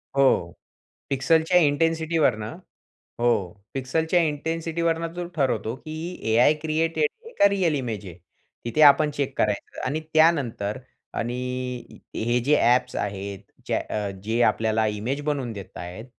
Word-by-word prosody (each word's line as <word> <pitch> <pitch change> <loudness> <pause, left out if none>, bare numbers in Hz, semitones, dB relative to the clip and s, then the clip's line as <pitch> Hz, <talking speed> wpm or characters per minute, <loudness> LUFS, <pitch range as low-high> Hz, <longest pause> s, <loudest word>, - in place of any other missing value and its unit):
हो 130 -11 +3 0.6
पिक्सलच्या 160 +5 +3
इंटेन्सिटीवरनं 160 -6 +1 0.6
हो 120 0 +3 0.4
पिक्सलच्या 160 +6 +1
इंटेन्सिटीवरनं 165 +2 -1
तो 175 0 -3
ठरवतो 130 -5 0
की 155 +3 -9 0.4
A-I 125 +6 +6
क्रिएटेड 160 - +1 0.2
आहे 460 - -11
का? 200 - +8
रिअल 185 -6 +1
इमेज 115 -7 -4
आहे? 90 -3 -9 0.5
तिथे 120 +6 0
आपण 150 +1 +3
चेक 140 -2 -3
करायचं 105 -1 -1
आणि 140 +5 -1
त्यानंतर 145 -11 +2 0.4
आणि 120 +1 -2 0.8
हे 120 +2 +1
जे 150 +3 +4
ॲप्स 125 +1 +3
आहेत 100 -1 -4 0.3
जे - - 0 0.4
जे 115 +3 0
आपल्याला 110 -1 +2
इमेज 110 +7 -2
बनवून 140 -5 -1
देत 100 -3 -9
आहेत 90 +6 -7
140 Hz, 125 wpm, -25 LUFS, 115-160 Hz, 0.8 s, का